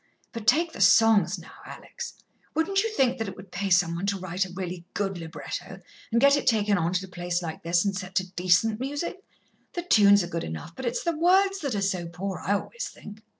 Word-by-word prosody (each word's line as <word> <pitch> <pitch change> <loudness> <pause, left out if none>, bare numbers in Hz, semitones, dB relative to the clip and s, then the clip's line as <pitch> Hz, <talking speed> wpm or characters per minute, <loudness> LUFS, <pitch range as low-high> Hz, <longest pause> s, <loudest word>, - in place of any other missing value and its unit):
But 230 -2 -7
take 330 +4 +3
the - - -6
songs, 210 +3 +5
now, - - -12
Alex; - - -8 0.4
wouldn't 390 +5 +2
you 450 - -1
think 270 - +1
that 225 - -2
it 195 - -6
would 190 -1 -13
pay 195 +2 -2
some 175 -2 +3
one 175 +4 -3
to 200 -1 0
write 185 +1 -2
really 180 -2 -5
good 195 -3 -2
libretto, 165 0 -7 0.3
and 235 - +3
get 280 +2 +6
it 285 - -2
taken 210 -3 +3
on 170 -3 +1
at 185 +1 -1
a - - -8
place 175 -1 -3
like 160 -1 -5
this 170 +3 +1
and 200 -1 0
set 185 0 -6
to 185 -1 0
decent 185 +5 +2
music? 290 +8 -4 0.5
The 345 - -3
tunes 205 - +6
are - - -4
good 170 -1 -3
enough, 80 - -7
but 260 - -4
it's 240 - -2
the 340 -2 0
words 385 +4 +3
that 280 - -2
are 200 - -1
so 185 -3 -1
poor, 180 +3 -5
I 200 - 0
always 480 - -3
think." 210 +1 -12
200 Hz, 230 wpm, -26 LUFS, 180-255 Hz, 0.5 s, get